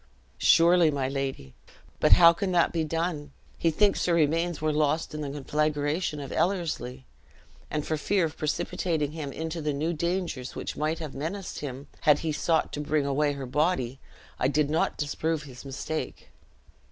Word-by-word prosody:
"Surely 170 0 +6
my 140 -3 -1
lady; 135 - -4 0.5
but - - +6
how 170 -1 +8
can 190 +2 -2
that 175 -2 +3
be 165 -2 +1
done? 155 -2 -2 0.3
He 165 - +3
thinks 200 +5 +2
her 170 - +3
remains 165 +1 +1
were 155 0 0
lost 150 +1 +1
in 150 - -4
the 145 - -3
conflagration 150 +2 -1
of 140 -2 -7
Ellerslie; 155 -9 -1 0.6
and 150 -1 -2
for 155 - -1
fear 190 +3 +1
of 160 0 -5
precipitating 155 0 -1
him 150 -3 -5
into 160 +3 -4
the 150 -1 -1
new 155 +4 -1
dangers 170 -5 -2
which - - -4
might 155 +2 -1
have 155 -4 -6
menaced 175 +7 -5
him 140 -1 -6
had 150 -3 +5
he 160 - +1
sought 160 +2 +1
to 150 - -3
bring 150 -1 0
away 145 +1 +1
her 140 -1 -5
body, 135 -2 0 0.4
I 130 - +2
did 145 +1 +1
not 160 - +1
disprove 155 +1 -1
his 130 -4 -11
mistake." 140 +3 -5
150 Hz, 175 wpm, -27 LUFS, 145-165 Hz, 0.6 s, how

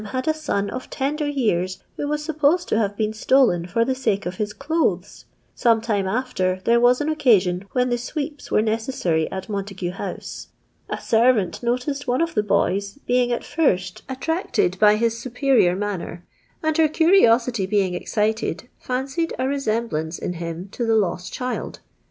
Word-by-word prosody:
had 255 +6 -3
a 315 - +4
son 205 -10 -2
of 255 - -6
tender 295 +3 -2
years, 185 -10 -1
who 290 - -3
was 300 0 -2
supposed 315 +2 +2
to - - 0
have 205 -2 0
been 215 -1 0
stolen 215 -7 +3
for 230 +6 +1
the 260 - 0
Kike 210 -6 -1
of 180 +1 -4
his 210 -1 -2
clothes. 275 - -2 0.3
Some 230 -2 +3
time 210 -4 -1
after, 190 -5 -1
there 235 +1 +4
was 245 +3 +4
an 295 - -1
occasion 200 - +2
when 250 0 +1
the 240 - +1
sweeps 290 +3 -5
were 210 - +3
necessary 220 -8 -1
at 190 0 -5
Montagu 195 -3 -4
House. 185 - -6 0.4
A - - -3
servant 225 -4 +2
noticed 255 +4 -2
one 250 +1 +1
of 335 0 0
the 210 - +2
boys, 200 0 0
being 245 0 +2
at 240 - -1
first 190 - 0
attracted 265 - -1
by 210 0 +6
his 230 +1 0
superior 250 -6 +2
manner, 190 -4 -4 0.4
and 315 0 +1
her 320 - +6
curiosity 250 - +3
being 195 -3 +1
excited 220 +5 -1
fancied 270 +6 -2
a 255 - 0
resemblance 220 - -1
in 180 - -4
him 170 +1 -6
to 240 - -3
the 225 -1 +2
lost 180 -4 0
child. 250 0 -4
230 Hz, 170 wpm, -22 LUFS, 195-265 Hz, 0.4 s, by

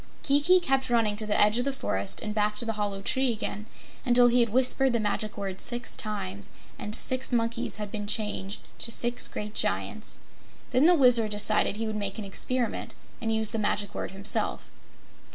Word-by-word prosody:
Kiki 295 +6 +4
kept 270 -6 0
running 225 -3 +2
to 215 0 +2
the 210 - +1
edge 210 +3 +5
of 245 - -1
the 275 - 0
forest 100 - -3
and 210 -1 -4
back 210 0 0
to 220 - -1
the 225 - -2
hollow 205 -2 -3
tree 260 +3 +1
again 210 -1 -4 0.4
until 245 -1 +5
he 245 +1 +3
had 235 -1 +3
whispered 260 +2 +4
the 235 - +1
Magic 215 0 -2
Word 195 -2 -4
six 240 0 +3
times 200 -2 -5 0.3
and 210 +1 -4
six 255 +2 0
monkeys 230 -1 -1
had 210 -2 -6
been 205 -1 -5
changed 210 -1 -2 0.2
to - - -4
six 240 +1 0
great 210 0 -6
Giants. - - -3 0.5
Then 260 +5 +4
the 355 - +6
Wizard 245 -6 +5
decided 210 0 +1
he 225 +1 -3
would 220 -1 -3
make 200 -2 -3
an 215 - -5
experiment 245 +5 -2 0.3
and 225 -1 -1
use 220 -1 +1
the 225 - -2
Magic 205 -1 -1
Word - - -4
himself. 195 +2 -2
220 Hz, 195 wpm, -27 LUFS, 210-245 Hz, 0.5 s, the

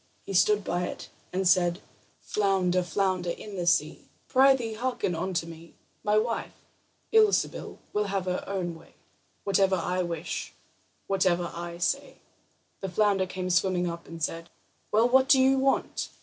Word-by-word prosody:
He 195 - -5
stood 210 +2 +4
by 180 0 -1
it - - -7 0.2
and 190 +1 0
said: 175 -1 +3 0.4
"Flounder, 190 -3 +1
flounder 180 0 -1
in 200 +4 -6
the 175 -2 -3
sea, 155 -2 +1 0.2
Prythee, 260 -4 +4
hearken 245 -5 -2
unto 170 0 -2
me: 165 0 -12 0.3
My 210 0 +2
wife, 230 +1 -1 0.6
Ilsebil, 435 -2 +2 0.2
will 210 0 +1
have 195 -2 -2
her 180 0 -2
own 185 -3 -2
way 160 - -16 0.5
Whatever 195 -1 +3
I 180 +1 -1
wish, 170 -2 -4 0.5
whatever 180 -3 +1
I 170 0 -6
say." 275 +10 -1 0.6
The 195 - -4
flounder 195 0 +2
came 185 0 -3
swimming 180 0 +2
up, 170 0 -6
and 165 -1 -8
said: 165 +1 -3 0.4
"Well, 225 +3 +4
what 260 +2 +4
do 270 - +7
you 265 +1 +4
want?" 270 +1 0
185 Hz, 150 wpm, -27 LUFS, 175-210 Hz, 0.6 s, do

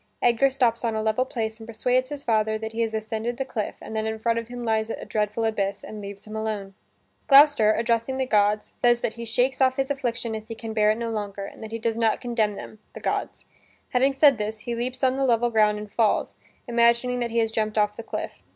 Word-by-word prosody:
Edgar 245 +3 +3
stops 245 -3 +1
on 230 -2 0
a 220 - 0
level 220 +4 +1
place 220 -3 -4
and 225 - -10
persuades 250 +3 0
his 290 -1 -6
father 220 -1 +1
that 220 0 -5
he 225 +1 -3
has 225 -1 -1
ascended 220 +2 -3
the 270 - -2
cliff 220 -5 -4
and 220 - -7
that 220 0 -1
in 220 0 -2
front 230 +1 0
of 230 - -7
him 245 0 -6
lies 220 -1 0
a - - -5
dreadful 210 +1 -1
abyss, 200 -3 -1
and 215 -1 -8
leaves 200 0 -9
him 215 0 -8
alone. 215 -3 -3 0.5
Gloucester, 280 -6 +7
addressing 235 +3 0
the 265 - 0
gods, 210 -2 +1
says 240 0 +4
that - - -1
he 235 0 -7
shakes 250 +4 0
off 260 -1 +4
his 270 +1 0
affliction 240 -4 -2
as 220 0 -6
he 225 - -6
can 225 0 -6
bear 210 -1 +3
it 215 - +2
no 230 -1 -3
longer, 205 -2 -4
and 220 - -10
that 220 - -6
he 230 - -3
does 225 0 -2
not 225 -1 +2
condemn 230 -4 0
them 215 - -9
the - - -8
gods. - - -3 0.4
Having 265 +2 +2
said 270 -3 +5
this, 215 +1 -3
he 235 - -4
leaps 250 +3 -4
on 260 0 +3
the 275 - 0
level 240 -2 +2
ground 210 -1 +3
and 210 -1 -8
falls, 220 -1 +1 0.3
imagining 235 +1 +3
that 240 -1 -1
he 230 - -3
has 225 -1 +2
jumped 215 -1 -1
off 210 0 +2
the 230 - -6
cliff. 225 - -6
225 Hz, 245 wpm, -25 LUFS, 215-245 Hz, 0.5 s, Gloucester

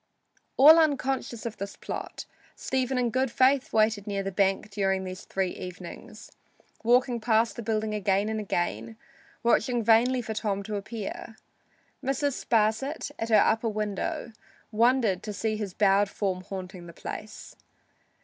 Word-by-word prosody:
All 310 +4 +9
unconscious 270 -6 0
of 225 -2 -5
this 200 +1 -6
plot, - - -6 0.3
Stephen 260 0 -1
in 245 -2 +1
good 260 +2 +1
faith 260 +2 +3
waited 215 -1 +2
near 200 -1 -2
the 195 - -3
bank 195 +2 0
during 195 -1 0
three 190 0 -3
evenings, 180 +3 -9 0.5
walking 245 +1 +3
past 220 -1 +2
the - - -5
building 215 -1 -1
again 200 -1 +1
and 220 0 -2
again, 115 - -2 0.5
watching 235 0 +2
vainly 240 +3 +4
for 220 - -4
Tom 200 -2 -2
to 210 +1 -5
appear. 215 +2 -6 0.7
Mrs. 275 +1 -1
Sparsit, 235 +7 0
at 225 - -3
her 220 - +5
upper 225 +1 +1
window, 215 - -3 0.4
wondered 230 -4 +2
to 210 - -6
see 215 +2 -1
his 205 -4 -5
bowed 200 0 +3
form 190 -3 -2
haunting 185 -2 -7
the 170 - -11
place. 215 +5 -8
215 Hz, 145 wpm, -27 LUFS, 200-245 Hz, 0.7 s, All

